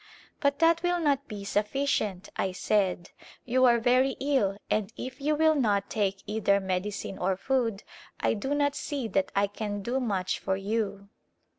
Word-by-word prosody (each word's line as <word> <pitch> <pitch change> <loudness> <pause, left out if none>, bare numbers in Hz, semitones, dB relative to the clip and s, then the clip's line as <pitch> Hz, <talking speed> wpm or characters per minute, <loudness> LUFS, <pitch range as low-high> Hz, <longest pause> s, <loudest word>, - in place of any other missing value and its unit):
" - - -30
But 280 -1 +2
that 330 +1 +4
will 355 0 +1
not 280 -3 +1
be 205 -2 -7
sufficient," 210 -2 -1
I 190 - -1
said. 185 -2 0 0.2
" - - -21
You 255 +1 +3
are 240 -1 +6
very 255 +3 +3
ill 265 -9 +1
and 210 -1 0
if 255 +1 -7
you 300 +2 +1
will 315 +1 +4
not 205 -8 +1
take 195 -2 -1
either 205 -1 +2
medicine 190 +1 -3
or 185 +1 0
food, 230 -3 0 0.4
I - - +2
do 265 +7 -2
not 285 -1 +2
see 280 -6 -3
that 195 -2 0
I 200 +1 +4
can 205 0 -4
do 245 +5 0
much 195 -7 -1
for 190 - -1
you." 200 -1 -2
215 Hz, 180 wpm, -28 LUFS, 200-270 Hz, 0.4 s, are